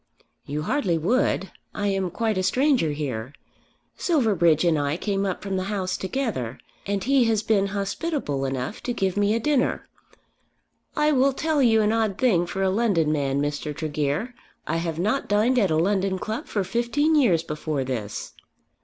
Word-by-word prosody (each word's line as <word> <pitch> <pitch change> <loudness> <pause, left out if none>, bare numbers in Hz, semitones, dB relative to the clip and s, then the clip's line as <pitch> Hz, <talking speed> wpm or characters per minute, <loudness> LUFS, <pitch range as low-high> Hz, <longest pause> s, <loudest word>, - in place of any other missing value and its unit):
"You 150 +2 -3
hardly 195 - 0
would. 195 - +1 0.2
I 205 - -2
am 195 -2 0
quite 220 +4 -1
a 185 - 0
stranger 255 - +2
here. 135 -4 -4 0.6
Silverbridge 195 - +2
and 165 -3 +3
I 145 +2 -1
came 200 0 -1
up 185 - -4
from 195 -2 -2
the 185 - -2
House 190 -2 -2
together, 190 - -3 0.3
and 200 -1 -1
he 270 -1 +3
has 220 -2 +1
been 205 -2 +2
hospitable 200 - -2
enough 130 - -3
to 245 - -2
give 190 -5 -1
me 205 +1 +2
a - - +1
dinner. 275 +1 0 1.1
I 300 -1 +3
will 270 -1 +3
tell 310 +1 0
you 225 -3 +4
an 210 +1 +2
odd 220 -4 0
thing 180 -9 +2
for 195 +2 -2
a 190 - +2
London 190 -8 +2
man, 140 -2 0
Mr. 145 +1 -3
Tregear. 155 - -2 0.3
I 165 - -1
have 165 -1 -3
not 215 +10 0
dined 220 +5 +3
at 200 -5 +2
a 155 - +1
London 190 +3 +1
club 220 +4 -4
for 205 - -1
fifteen 240 - +1
years 215 - +3
before 150 -3 -3
this." 115 -6 -5
195 Hz, 175 wpm, -24 LUFS, 160-235 Hz, 1.1 s, you